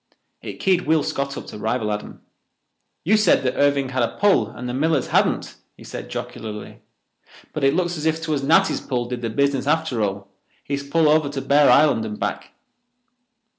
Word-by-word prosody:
It -, -, -8 dB
keyed 185 Hz, -3 st, +1 dB
Will 155 Hz, -1 st, +3 dB
Scott 140 Hz, 0 st, -3 dB
up -, -, -7 dB
to 105 Hz, -, -9 dB
rival 110 Hz, 0 st, -1 dB
Adam. 105 Hz, -, -7 dB, 0.8 s
"You 205 Hz, +6 st, +3 dB
said 215 Hz, -9 st, +3 dB
that 130 Hz, -1 st, 0 dB
Irving 140 Hz, -2 st, +2 dB
had 130 Hz, 0 st, -1 dB
a 115 Hz, -, -1 dB
pull 195 Hz, -, +3 dB
and 125 Hz, -, -8 dB
the 125 Hz, -, -4 dB
Millers 150 Hz, +1 st, 0 dB
hadn't," -, -, 0 dB, 0.2 s
he -, -, -14 dB
said -, -, -8 dB
jocularly. 105 Hz, -1 st, -7 dB, 0.7 s
"But 155 Hz, -, -4 dB
it 135 Hz, +2 st, +3 dB
looks 175 Hz, -1 st, -1 dB
as 155 Hz, +1 st, -2 dB
if 160 Hz, 0 st, 0 dB
'twas 155 Hz, -3 st, -2 dB
Natty's 165 Hz, +8 st, +3 dB
pull 125 Hz, -3 st, -2 dB
did 120 Hz, 0 st, -5 dB
the 115 Hz, -, -2 dB
business 140 Hz, +3 st, 0 dB
after 155 Hz, -6 st, 0 dB
all—his 100 Hz, +7 st, -5 dB
pull 155 Hz, +3 st, +1 dB
over 150 Hz, -1 st, +3 dB
to 140 Hz, -1 st, -4 dB
Bear 140 Hz, +1 st, +4 dB
Island 140 Hz, -6 st, +4 dB
and 105 Hz, -1 st, -6 dB
back." -, -, -3 dB
140 Hz, 185 wpm, -22 LUFS, 120-155 Hz, 0.8 s, Bear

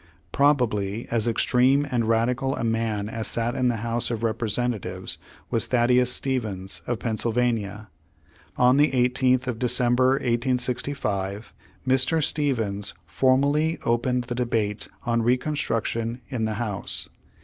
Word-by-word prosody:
Probably 115 Hz, -7 st, +1 dB
as 115 Hz, -1 st, +1 dB
ex 115 Hz, -, +1 dB
treme 135 Hz, +3 st, +3 dB
and 115 Hz, -2 st, +1 dB
radical 125 Hz, +4 st, +1 dB
a -, -, -4 dB
man 115 Hz, -2 st, -1 dB
as 110 Hz, 0 st, -4 dB
sat 115 Hz, +1 st, -1 dB
in 130 Hz, -1 st, +1 dB
the 120 Hz, -, +1 dB
House 115 Hz, 0 st, +1 dB
of 115 Hz, -1 st, -3 dB
Representatives, 110 Hz, -4 st, -1 dB, 0.3 s
v/as 115 Hz, 0 st, +2 dB
Thaddeus 125 Hz, +1 st, +3 dB
Stevens, 110 Hz, -9 st, -2 dB
of 120 Hz, -, -1 dB
Penn 110 Hz, -1 st, -3 dB
sylvania. 110 Hz, -3 st, -1 dB, 0.7 s
On 125 Hz, +2 st, +5 dB
the 150 Hz, +1 st, +5 dB
18th 125 Hz, 0 st, +2 dB
of 120 Hz, -3 st, -3 dB
December, 125 Hz, +1 st, +3 dB
1865, 120 Hz, -5 st, -1 dB, 0.3 s
Mr. 130 Hz, +5 st, +2 dB
Stevens 110 Hz, -, -1 dB
foraially 140 Hz, -, +2 dB
opened 120 Hz, +2 st, +1 dB
the 120 Hz, -, -5 dB
debate 115 Hz, -4 st, -1 dB, 0.2 s
on 115 Hz, -1 st, +1 dB
Recon 125 Hz, +6 st, +1 dB
struction 115 Hz, -1 st, -2 dB
in 120 Hz, -5 st, -2 dB
the 110 Hz, -1 st, -2 dB
House. 105 Hz, -3 st, -3 dB
120 Hz, 135 wpm, -25 LUFS, 110-130 Hz, 0.7 s, On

